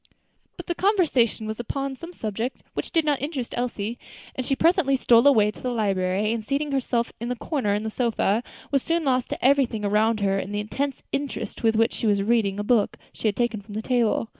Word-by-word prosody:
But - - -8
the 345 - -1
conversation 330 - +2
was 220 +1 -5
upon 275 +3 -3
some 335 +6 -9
subject 225 - -4
which - - -4
did 325 -2 +1
not 290 -3 +1
interest 285 -4 -4
Elsie, 235 -2 -3 0.3
and 260 - -3
she 270 - 0
presently 325 -3 +3
stole 240 -1 +5
away 215 -7 +5
to - - -15
the 255 - -2
library, 200 -2 0
and 230 -2 -3
seating 285 +4 -1
herself 245 -3 0
in 235 +2 -4
a - - -1
corner 235 -5 -1
of 210 - -2
the 220 - -3
sofa, 230 -2 +1 0.3
was 275 -2 +2
soon 335 +3 0
lost 255 -2 +1
to - - -4
everything 255 -6 +3
around 215 +2 +2
her 195 -1 +2
in 200 - -5
the 205 - -1
intense 270 +6 -3
interest 280 0 -4
with 225 -2 +3
which 225 +1 +3
she 225 - -2
was 200 -1 +2
reading 210 -3 +1
a 205 - -2
book 215 -1 +2 0.2
she - - -2
had 205 - +1
taken 240 -3 -1
from 205 +1 -11
the 220 - -3
table. 235 -3 +1
235 Hz, 220 wpm, -25 LUFS, 215-275 Hz, 0.3 s, stole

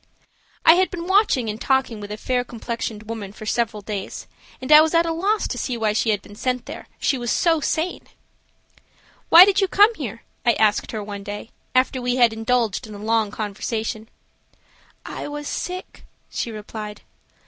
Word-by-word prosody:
I 325 - +9
had 370 +2 +3
been 345 -1 -6
watching 380 - +3
and 215 +1 -4
talking 265 -5 +1
with 205 0 -8
a 210 - -4
fair 250 +2 -1
complexioned 230 -2 -5
woman 215 -3 -6
for 215 - -10
several 225 -2 -1
days, 200 -1 -5 0.3
and 260 - -5
I 305 0 +10
was 320 +1 +1
at 335 0 +4
a 330 - -1
loss 405 +6 0
to - - -3
see 250 -3 -2
why 215 -2 +1
she 220 +1 +1
had 205 -2 0
been 205 - -13
sent 250 +3 -2
there, - - -9
she 270 - +1
was 240 -1 -3
so 330 -2 +2
sane. 320 +5 -2 1.2
"Why 345 +3 +11
did 400 0 +2
you 390 - +3
come 415 +5 +5
here?" 240 - -7 0.2
I 240 -2 +4
asked 215 -2 +1
her 215 -2 -4
one 200 -1 -7
day, 205 +2 -7 0.2
after 255 0 +2
we 245 0 0
had 240 -3 +4
indulged 225 -1 0
in 215 - -9
a - - -8
long 220 0 +1
conversation. 220 +1 -4 1.0
"I - - -6
was 295 0 -6
sick," 365 +1 -5 0.3
she - - -3
replied. 210 -1 -7
235 Hz, 190 wpm, -22 LUFS, 215-300 Hz, 1.2 s, Why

